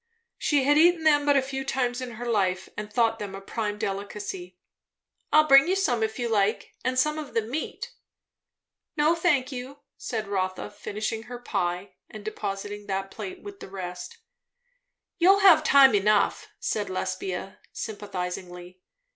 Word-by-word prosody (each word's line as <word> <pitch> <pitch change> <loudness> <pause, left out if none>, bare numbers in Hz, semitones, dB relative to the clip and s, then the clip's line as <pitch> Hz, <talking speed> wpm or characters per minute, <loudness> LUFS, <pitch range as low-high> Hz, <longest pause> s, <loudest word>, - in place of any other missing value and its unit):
She 290 -3 +2
had 290 +2 +4
eaten 340 0 +5
them 290 -2 +4
but 285 -1 +5
a 270 - +3
few 270 0 -4
times 255 -2 -1
in 250 -2 -6
her 240 +2 -7
life, 190 -5 0
and 210 0 -6
thought 225 0 +2
them 200 -2 -5
a - - -6
prime 210 +1 -3
delicacy. 200 -3 -5 0.7
"I'll 310 0 +6
bring 275 +1 +8
you 375 - +2
some 250 -12 +1
if 220 0 -1
you 240 - -1
like, 210 -2 0
and 255 0 -1
some 300 +4 +2
of 300 -3 -8
the 230 - +2
meat." 310 - -5 1.0
"No, 300 +2 +4
thank 300 -6 +1
you," 265 +2 -7 0.2
said 220 -4 -4
Rotha, 185 -2 -2
finishing 215 +2 -4
her 245 - -6
pie 195 -5 -3 0.2
and 215 -1 -10
depositing 205 -1 -5
that 195 0 -3
plate 370 -1 -7
with 400 -1 -9
the - - -9
rest. 180 - -7 1.0
"You'll 385 +3 +6
have 335 -6 +7
time 275 -4 +7
enough," 205 0 +2
said - - -2
Lesbia 390 -1 -4
sympathizingly. 180 -3 -6
225 Hz, 160 wpm, -26 LUFS, 200-285 Hz, 1.0 s, bring